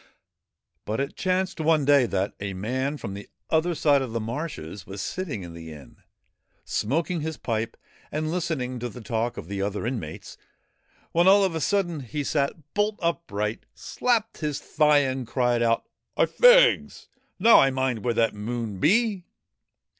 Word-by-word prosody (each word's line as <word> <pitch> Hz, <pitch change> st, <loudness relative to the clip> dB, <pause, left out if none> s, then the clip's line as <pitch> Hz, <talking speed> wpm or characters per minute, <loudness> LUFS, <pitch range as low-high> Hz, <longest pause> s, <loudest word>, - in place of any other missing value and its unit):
But 110 Hz, +3 st, -3 dB
it 140 Hz, 0 st, -3 dB
chanced 185 Hz, 0 st, -1 dB
one 155 Hz, -2 st, +2 dB
day 140 Hz, -3 st, +5 dB
that 95 Hz, -1 st, -1 dB
a 100 Hz, -1 st, -4 dB
man 130 Hz, +9 st, -2 dB
from 105 Hz, -8 st, -6 dB
the 100 Hz, +1 st, -9 dB, 0.2 s
other 165 Hz, +2 st, +2 dB
side 145 Hz, -3 st, +3 dB
of 125 Hz, -4 st, -4 dB
the 115 Hz, -, -1 dB
marshes 110 Hz, -, -6 dB
was 95 Hz, +1 st, -7 dB
sitting 140 Hz, -, -4 dB
in 85 Hz, -1 st, -9 dB
the 80 Hz, -1 st, -9 dB
inn, 75 Hz, -3 st, -13 dB, 0.7 s
smoking 165 Hz, -, -1 dB
his 160 Hz, 0 st, -4 dB
pipe 115 Hz, 0 st, -3 dB, 0.3 s
and 155 Hz, +1 st, -2 dB
listening 155 Hz, -8 st, -2 dB
to 120 Hz, +1 st, -4 dB
the 120 Hz, +3 st, -10 dB
talk 115 Hz, +1 st, -2 dB
of -, -, -7 dB
the 100 Hz, 0 st, -4 dB
other 100 Hz, +2 st, -2 dB
inmates, 110 Hz, -11 st, -5 dB, 0.7 s
when 170 Hz, +2 st, +3 dB
all 200 Hz, +1 st, +7 dB
of 190 Hz, -3 st, +1 dB
a 160 Hz, -, -3 dB
sudden 175 Hz, -3 st, 0 dB
he 145 Hz, +3 st, -4 dB
sat 145 Hz, +1 st, -2 dB
bolt 205 Hz, +1 st, 0 dB
upright, 115 Hz, -, -2 dB
slapped 230 Hz, -3 st, -1 dB
his 150 Hz, -3 st, -2 dB
thigh 150 Hz, -1 st, +3 dB
and 130 Hz, -2 st, -3 dB
cried 120 Hz, -1 st, +1 dB
out, 115 Hz, -1 st, +2 dB, 0.2 s
' -, -, -51 dB
I' -, -, +5 dB
fegs! -, -, +5 dB, 0.3 s
Now 225 Hz, +5 st, +7 dB
I 135 Hz, -, +5 dB
mind 130 Hz, -4 st, -1 dB
where 120 Hz, -2 st, 0 dB
that 115 Hz, -1 st, +2 dB
there 105 Hz, -, -9 dB
Moon 115 Hz, -3 st, -4 dB
be 200 Hz, -, +2 dB
135 Hz, 175 wpm, -25 LUFS, 110-165 Hz, 0.7 s, all